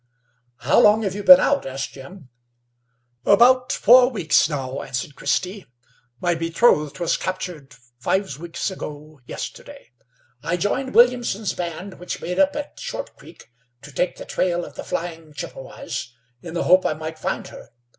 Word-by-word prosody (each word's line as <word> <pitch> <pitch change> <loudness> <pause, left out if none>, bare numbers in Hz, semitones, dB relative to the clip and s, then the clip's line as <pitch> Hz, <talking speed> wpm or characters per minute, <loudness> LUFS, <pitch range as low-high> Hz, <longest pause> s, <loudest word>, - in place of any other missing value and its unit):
"How - - +3
long 215 +1 +5
have 195 -3 -1
you 205 +1 -5
been 275 +6 +10
out?" 285 - +2
asked 135 +1 -5
Jim. 135 +2 -12 0.9
"About 250 +5 +5
four 245 +2 +6
weeks 170 - +2
now," 135 -3 -4
answered 135 +3 -5
Christy. 185 +8 -2 0.5
"My 175 -1 +1
betrothed 165 -3 +2
was 170 - 0
captured 175 -7 -5 0.2
five 190 +2 -1
weeks 170 +3 -4
ago 150 -4 -9
yesterday. 285 -1 -8 0.5
I 165 +3 -1
joined 260 +8 -2
Williamson's 240 -4 +3
band, 180 +2 -6
which 180 - -5
made 180 +1 -4
up 290 0 +3
at 295 0 -6
Short - - -6
Creek - - -16 0.3
to 150 - -11
take 175 +6 -1
the - - -8
trail 175 -1 -1
of - - -12
the - - -8
flying 165 -2 -5
Chippewas, 135 -3 -7 0.3
in 170 -1 -8
the 170 - 0
hope 185 +1 +5
I - - 0
might 155 +1 -7
find - - -3
her. - - -13
175 Hz, 155 wpm, -22 LUFS, 150-210 Hz, 0.9 s, been